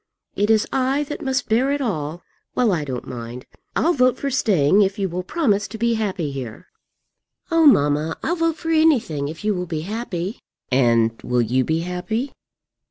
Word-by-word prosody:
It 205 +1 +1
is 220 -1 +4
I 265 +2 +1
that 295 - -5
must 265 -3 -1
bear 240 +5 +2
it 285 - 0
all. 170 - -3 0.3
Well, 240 -4 +3
I 165 -5 0
don't 130 -3 -5
mind; 120 0 -7 0.3
I'll 340 - +3
vote 255 -3 +3
for 280 - -3
staying 200 - +3
if 195 0 +1
you 195 -2 0
will 180 +1 -3
promise 210 - 0
to 225 - -8
be 235 +1 +1
happy 190 -9 -2
here. 125 -5 -7 0.9
Oh, 330 -1 +5
mamma, 150 - +3
I'll 340 - 0
vote 330 -2 +1
for 325 0 -3
anything 265 - +2
if 160 +6 -8
you 215 - +2
will 180 -1 -3
be 160 -2 -3
happy." 195 0 -4 0.3
"And 115 -3 +3
will 125 -1 +1
you 125 +3 +1
be 160 +4 0
happy?" 180 +9 -3
195 Hz, 185 wpm, -22 LUFS, -, 0.9 s, Oh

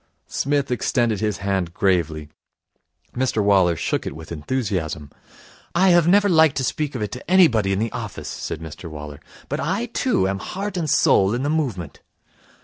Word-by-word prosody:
Psmith 140 -1 -1
extended 120 -3 +1
his 105 -3 -1
hand 95 -3 -1
gravely. 80 -6 0 0.9
Mr 125 -4 0
Waller 95 -4 +4
shook - - -2
it - - -5
with 80 +1 -10
enthusiasm. 85 - -3 0.6
'I 185 +2 +5
have 175 -2 +5
never 205 +3 +5
liked 160 -5 +4
to 130 - 0
speak 145 +2 -2
of 110 - -2
it 105 - -4
to 125 - -8
anybody 130 - +4
in 95 - +1
the 110 +2 -1
office,' 115 -5 -6
said 80 - -5
Mr 80 +2 -8
Waller, 75 -2 -8 0.3
'but - - -3
I, 190 - -1
too, 240 - 0
am 95 0 -2
heart 195 - -5
and 165 -4 -1
soul 100 -4 +4
in 125 - -2
the 145 - 0
movement.' 115 - -2
110 Hz, 175 wpm, -22 LUFS, -, 0.9 s, I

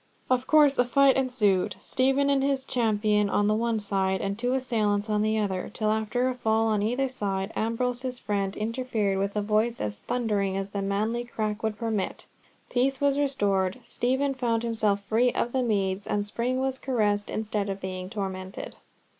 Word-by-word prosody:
Of 255 0 +2
course 295 -3 +5
a - - +7
fight 275 +2 +4
ensued, 210 -8 +1
Stephen 270 +2 +1
and 275 -1 +3
his 275 -1 0
champion 210 -4 +1
on 205 - +2
the 210 - +3
one 230 +1 0
side, 195 -2 0
and 195 0 -2
two 245 +4 -1
assailants 215 -5 0
on 210 0 +2
the 215 +1 +1
other, 195 -4 -1
till 215 -1 0
after 220 +4 0
a 255 - 0
fall 225 -2 +1
on 210 -2 +1
either 245 +6 +1
side, 200 -5 -3
Ambrose's 250 +3 -1
friend 200 -3 -2
interfered 220 -3 -1
with 200 +1 -1
a 210 - 0
voice 220 +3 +1
as 105 -1 -3
thundering 205 -6 -1
as 195 0 -3
the 200 0 -3
manly 215 +4 -1
crack 215 -2 -3
would 220 -1 -2
permit, 220 -4 -2 0.4
peace 260 +2 +1
was 285 0 +2
restored, 200 -8 +1
Stephen 265 +3 0
found 235 -3 0
himself 215 -3 0
free 230 +5 +2
of 240 - -1
the 260 - +1
meads, 200 -4 0
and 205 -1 0
Spring 240 +5 -1
was 265 0 -1
caressed 210 -6 0
instead 210 -2 -2
of 195 0 -3
being 185 -1 -5
tormented. 190 -2 -5
220 Hz, 180 wpm, -27 LUFS, 200-250 Hz, 0.4 s, a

